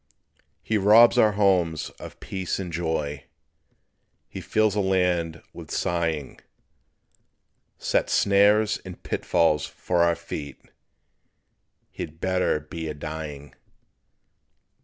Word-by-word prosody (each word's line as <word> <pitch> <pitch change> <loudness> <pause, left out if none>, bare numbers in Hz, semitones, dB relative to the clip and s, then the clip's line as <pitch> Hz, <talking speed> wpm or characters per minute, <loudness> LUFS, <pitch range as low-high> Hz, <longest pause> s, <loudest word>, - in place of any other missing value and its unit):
He 110 -1 0
robs 115 +5 +6
our 110 -3 +4
homes 90 -6 +1
of - - -10
peace 95 -2 -4
and 90 -3 -6
joy; 80 -4 -3 1.0
He - - -8
fills 110 -2 +1
the 105 - -1
land 90 -4 0
with - - -10
sighing; 80 -5 -2 1.4
Sets - - 0
snares 105 +2 +3
and 90 -2 -10
pitfalls 75 -3 +1
for 90 -1 -1
our 85 0 +3
feet, 70 -4 -7 1.3
(He'd 80 +1 -8
better 90 -4 +1
be 80 +2 -7
a 75 - -5
dying.) 75 -2 -7
85 Hz, 105 wpm, -25 LUFS, 80-100 Hz, 1.4 s, robs